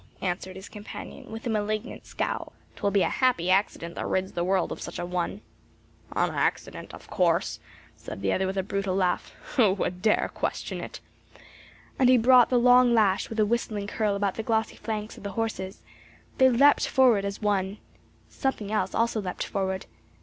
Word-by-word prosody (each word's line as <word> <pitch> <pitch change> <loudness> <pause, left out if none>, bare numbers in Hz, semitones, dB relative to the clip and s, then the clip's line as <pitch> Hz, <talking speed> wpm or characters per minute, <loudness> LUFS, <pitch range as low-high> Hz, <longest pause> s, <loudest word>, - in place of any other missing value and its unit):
answered 185 0 -3
his 190 +1 -9
companion 210 0 -9
with 225 +2 -7
a - - -1
malignant 215 +2 -3
scowl. - - -3 0.2
"'Twill 200 - 0
be 200 -2 +3
a - - +1
happy 240 -9 +1
accident 185 -3 +1
that - - -4
rids 190 0 -1
the 175 - -2
world 185 0 +1
of - - -6
such - - -6
an 175 - -5
one." 180 -1 -2 0.7
"An - - +2
accident - - -2
of - - -12
course," - - +1 0.4
said 100 - -9
the 95 - +2
other 190 0 0
with 190 +1 -3
a 190 - +1
brutal 195 -1 -2
laugh. 185 -2 0 0.3
"Who 215 -7 +5
would 180 -2 -3
dare 215 +1 +2
question - - -3
it?" - - -8 1.0
And 255 -2 +5
he 255 - +7
brought 245 +1 +6
the 250 - +3
long 245 0 +6
lash 205 -4 +2
with 225 - -4
a 215 - +5
whistling 215 -2 -1
curl 210 0 0
about 200 -1 0
the - - -4
glossy 220 0 -1
flanks 215 -1 -5
of - - -12
the 200 -1 -5
horses; 195 -3 -4 0.6
they 260 0 +7
leapt 280 +4 +5
forward 250 -7 +4
as 200 0 -4
one. 200 -1 0 0.5
Something 220 -6 -3
else 195 -3 -1
also 230 -1 +1
leapt 180 -2 -4
forward. 190 -1 -2
205 Hz, 185 wpm, -27 LUFS, 190-230 Hz, 1.0 s, he